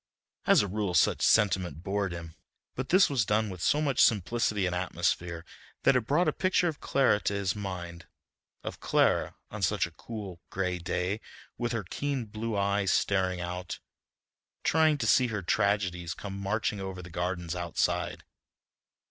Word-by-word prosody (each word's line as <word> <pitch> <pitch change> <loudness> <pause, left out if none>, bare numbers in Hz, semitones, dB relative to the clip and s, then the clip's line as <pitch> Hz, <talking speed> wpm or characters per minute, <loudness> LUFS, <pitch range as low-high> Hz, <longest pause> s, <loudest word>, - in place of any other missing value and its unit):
As - - +6
a - - -2
rule 100 -2 -2
such - - +3
sentiment 95 -6 +2
bored 100 -1 -1
him, 85 -1 -7 0.4
but 130 0 -4
this 190 +2 +6
was 135 -6 +1
done 105 +1 +1
with 90 -2 -8
so 145 - +3
much 140 -4 +2
simplicity 105 -1 +2
and 90 - -1
atmosphere, 85 -2 -1 0.4
that 135 - +5
it 120 -3 +1
brought 170 +6 +3
a - - +2
picture 185 -1 +2
of 160 -4 -3
Clara 130 -6 +3
to 100 - -1
his 100 -1 0
mind, 90 -4 -6 0.6
of - - -6
Clara - - +2 0.2
on - - -6
such - - +2
a 85 - -9
cool, 95 0 -8
gray 90 -2 -2
day 90 +5 -2 0.3
with 120 0 -2
her 115 -3 -2
keen 135 +6 -3
blue 110 0 -4
eyes 100 -1 +1
staring 95 -2 +1
out, 90 +1 -4 0.9
trying 155 -1 +4
to - - -2
see 125 - +4
her 105 -4 -3
tragedies 95 -4 0
come 100 -1 -6
marching 100 +1 -1
over 95 -1 -5
the 90 - -11
gardens 90 0 -2
outside. 85 -2 -1
100 Hz, 165 wpm, -29 LUFS, 90-115 Hz, 0.9 s, As